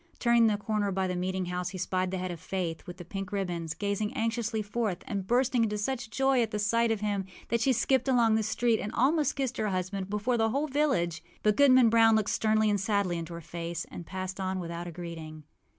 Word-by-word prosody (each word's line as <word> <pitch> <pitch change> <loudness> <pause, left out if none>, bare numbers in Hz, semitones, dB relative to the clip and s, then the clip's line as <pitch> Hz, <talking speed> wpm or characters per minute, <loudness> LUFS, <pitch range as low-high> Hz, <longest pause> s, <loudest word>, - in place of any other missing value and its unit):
Turning 235 -1 +4
the 210 -1 +2
corner 205 -1 -1
by 190 0 0
the 180 -1 -2
meeting 185 +1 -2
house, 180 0 -3
he 190 - -7
spied 185 0 -1
the 190 - -3
head 185 0 -3
of 170 - -7
Faith, 180 -2 -4
with 175 0 -8
the 175 - -9
pink 195 +2 -5
ribbons, 175 -5 -3
gazing 205 +4 -1
anxiously 225 -1 -1
forth, 210 -3 -2
and 195 -2 -4
bursting 245 +1 +2
into 210 -1 0
such 240 +2 -3
joy 265 +1 +2
at 215 -2 -1
sight 230 +3 +2
of 220 -2 0
him 205 -2 -1 0.3
that 235 -1 +1
she 265 - +3
skipped 255 +2 +2
along 240 -4 +4
the 220 - +3
street 225 +1 +1
and 210 - -4
almost 295 +5 +2
kissed 265 -2 -2
her 215 - 0
husband 185 +1 -3
before 210 +4 0
the 225 0 +3
whole 280 +6 0
village. 260 - 0 0.2
But 210 -1 +3
Goodman 260 -3 +6
Brown 225 -1 +6
looked 215 -2 +1
sternly 215 0 +2
and 205 -1 +2
sadly 195 -3 0
into 165 0 -6
her 170 - -7
face, 170 +1 -5
and 175 - -7
passed 185 +2 -5
on 190 0 -2
without 170 0 -5
a - - -6
greeting. 165 -2 -8
205 Hz, 230 wpm, -29 LUFS, 180-230 Hz, 0.3 s, Goodman